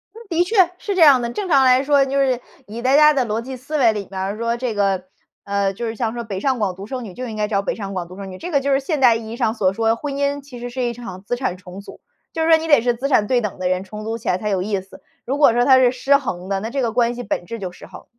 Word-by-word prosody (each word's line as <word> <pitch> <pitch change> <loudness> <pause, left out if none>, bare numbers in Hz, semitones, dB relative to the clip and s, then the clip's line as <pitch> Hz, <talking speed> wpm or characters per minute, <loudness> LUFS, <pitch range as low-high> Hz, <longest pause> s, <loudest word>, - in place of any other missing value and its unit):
嗯， - - -10
的 340 0 +2
确， 440 +6 -4 0.2
是 405 - -3
这 370 - +1
样 280 -5 +7
的。 235 - -2
正 390 +10 -4
常 275 -6 +4
来 255 0 +5
说 280 -1 +3
就 275 +1 -2
是， 260 -3 +1 0.3
以 225 +3 -7
大 260 +2 +3
家 300 +1 +7
的 265 -3 +1
逻 220 0 -2
辑 260 +2 -7
思 275 +5 -4
维 235 -6 +4
里 205 -2 -5
面 190 - -5
儿， 195 +3 -3
说 230 +1 -1
这 245 -2 -2
个， 195 -3 0 0.4
呃， 200 -1 0
就 235 +5 -5
是 225 - -4
像 225 0 -2
说 240 0 -4
北 200 -4 -5
上 260 +3 0
广 195 -4 -1
独 195 +2 -8
生 255 +3 -5
女， 190 - -9
就 250 +6 -6
应 220 - -6
该 210 - 0
找 200 -2 0
北 - - -3
上 195 -2 -6
广 180 -2 -4
独 185 +2 -12
生 195 -1 -7
女， 185 - -9
这 355 - -7
个 285 - +3
就 275 +1 -1
是 270 - +3
现 290 +1 -2
代 245 -3 +6
意 225 -1 -6
义 235 - -6
上 225 -4 +1
所 195 -5 +1
说 225 +2 +1
婚 280 +3 -5
姻 285 0 -1
其 270 -3 -11
实 245 +1 -5
是 255 +1 -3
一 240 -1 -1
场 195 -6 -9
资 245 - -2
产 245 -7 -2
重 180 0 -11
组。 - - -13 0.3
就 320 - -1
是 325 - +1
说 320 - +7
你 320 - -5
得 290 -7 +5
是 245 0 +1
资 265 +4 -3
产 215 -7 +3
对 245 +1 +2
等 210 -4 -5
的 185 - -1
人， 185 0 0
重 210 +2 -9
组 225 +1 -3
起 - - -11
来 180 - +2
才 210 +2 -3
有 190 -2 0
意 200 0 -1
思。 190 - -16 0.2
如 275 +3 -2
果 290 - +6
说 240 +1 +2
它 265 -1 +7
是 255 -1 +4
失 275 +2 +2
衡 185 -10 -5
的， 195 - 0
那 225 - -4
这 270 +2 -2
个 235 - 0
关 240 0 +2
系 245 0 -6
本 185 - -3
质 230 +4 -6
就 185 -3 -5
失 180 - -13
衡。 - - -13
235 Hz, 355 characters per minute, -20 LUFS, 200-270 Hz, 0.4 s, 样